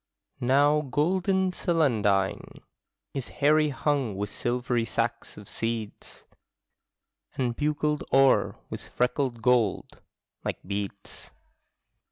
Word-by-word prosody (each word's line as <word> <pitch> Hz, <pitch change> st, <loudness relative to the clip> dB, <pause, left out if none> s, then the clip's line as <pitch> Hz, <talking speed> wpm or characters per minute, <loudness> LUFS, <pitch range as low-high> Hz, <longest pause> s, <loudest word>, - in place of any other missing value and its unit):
Now 145 Hz, +4 st, +3 dB
golden 185 Hz, +7 st, +1 dB
celandine 110 Hz, -, 0 dB, 0.5 s
Is 135 Hz, -3 st, -4 dB
hairy 150 Hz, +1 st, +3 dB
hung 135 Hz, -5 st, -1 dB
with 105 Hz, +1 st, -4 dB
silvery 120 Hz, +1 st, -1 dB
sacks 115 Hz, +1 st, -3 dB
of 105 Hz, -1 st, -11 dB
seeds. 115 Hz, -2 st, -5 dB, 1.1 s
And 125 Hz, -3 st, 0 dB
bugled 150 Hz, +1 st, 0 dB
o'er 135 Hz, 0 st, +4 dB, 0.2 s
with -, -, -5 dB
freckled 125 Hz, -1 st, -1 dB
gold, 120 Hz, -5 st, +1 dB, 0.4 s
like -, -, -2 dB
beads. 100 Hz, 0 st, -6 dB
125 Hz, 95 wpm, -27 LUFS, 115-150 Hz, 1.1 s, o'er